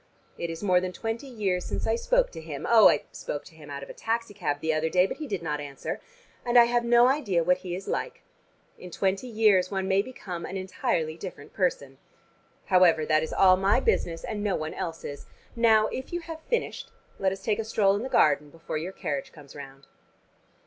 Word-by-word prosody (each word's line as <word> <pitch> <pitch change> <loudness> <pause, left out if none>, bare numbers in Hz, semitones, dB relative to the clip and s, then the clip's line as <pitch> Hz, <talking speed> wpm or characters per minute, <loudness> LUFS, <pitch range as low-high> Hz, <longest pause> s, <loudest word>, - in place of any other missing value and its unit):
It 170 - -4
is 165 +4 -6
more 180 -3 +3
than 185 0 -3
twenty 225 +7 -4
years 200 -8 -1
since - - -4
I 225 - +2
spoke - - +1
to 160 - -8
him 155 -3 -6
oh, 225 -2 +8
I 145 - +1
spoke 145 - -6
to 170 - -15
him 150 -2 -13
out 140 -1 -6
of - - -11
a - - -10
taxi 230 -1 -2
cab 145 -8 -2
the 160 +1 0
other 155 +1 0
day, 180 +2 +4
but - - -5
he 310 - -6
did 195 -8 -3
not 150 -2 -2
answer 140 -1 -6 0.4
and 245 0 +2
I 240 - +10
have 240 0 +1
no 240 +1 +5
idea 235 - +1
what 180 +2 +2
he 180 -1 -5
is 190 +1 -8
like. - - -3 0.6
In 180 - -9
twenty 195 +6 -1
years 210 -5 +3
one 190 -1 -2
may 195 0 +3
become 195 -7 -7
an 195 - -5
entirely 185 -4 -2
different 175 -6 -9
person. 140 -8 -1 0.7
However, 180 -4 +4
that 155 0 +3
is 160 - -4
all 185 -1 +5
my 195 +2 +3
business, 170 - 0
and 210 - -4
no 205 -3 +1
one 155 0 -4
else's. 160 -4 -6 0.3
Now, 225 -2 +5
if 260 - -6
you 345 0 -3
have 325 -1 -8
finished, 475 0 -2 0.3
let 190 -1 +2
us 195 0 -7
take 215 -1 0
a - - 0
stroll 205 -3 +2
in 205 - -2
the 260 - -4
garden 150 - +3
before 165 0 -5
your 180 +4 -5
carriage 140 -6 -4
comes 145 -4 -14
round." 135 -1 -11
185 Hz, 220 wpm, -27 LUFS, 160-225 Hz, 0.7 s, I